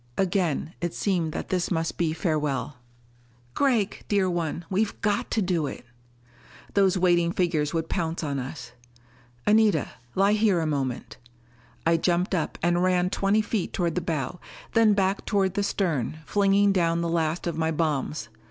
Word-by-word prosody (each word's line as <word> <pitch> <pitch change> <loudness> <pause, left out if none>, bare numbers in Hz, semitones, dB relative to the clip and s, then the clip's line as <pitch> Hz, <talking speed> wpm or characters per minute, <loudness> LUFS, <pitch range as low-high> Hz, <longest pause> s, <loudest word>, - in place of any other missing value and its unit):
Again 175 -4 0
it 175 -1 -2
seemed 175 -6 0
that - - -5
this 180 -2 0
must 165 -2 -1
be 165 -2 0
farewell. 150 -5 -1 0.8
"Gregg, 235 -8 +1
dear 200 -2 +2
one, 170 -1 -2
we've 205 +2 -1
got 205 -1 0
to 220 - +1
do 175 -5 0
it!" 125 - -8 0.9
Those 195 -2 +3
waiting 175 -2 +3
figures 165 -5 0
would 160 -1 -2
pounce 165 -1 -2
on 140 -2 -2
us. 125 -2 -7 0.7
"Anita, 210 -6 +3 0.3
lie 195 +2 +4
here 210 -4 +3
a 160 - -1
moment." 135 -5 -3 0.7
I 165 0 +4
jumped 175 +3 +1
up 165 -4 -1
and 175 0 +2
ran 180 0 +2
twenty 200 +2 +2
feet 210 -3 -2
toward 170 -3 0
the 180 - -1
bow; 160 -1 -3 0.3
then 220 -2 +5
back 195 0 +1
toward 195 -3 +1
the 205 - 0
stern, 165 - -1
flinging 200 0 +3
down 170 -3 +1
the 170 - -1
last 165 0 -1
of 170 -2 -2
my 160 0 0
bombs. 155 -4 -1
175 Hz, 160 wpm, -26 LUFS, 160-195 Hz, 0.9 s, then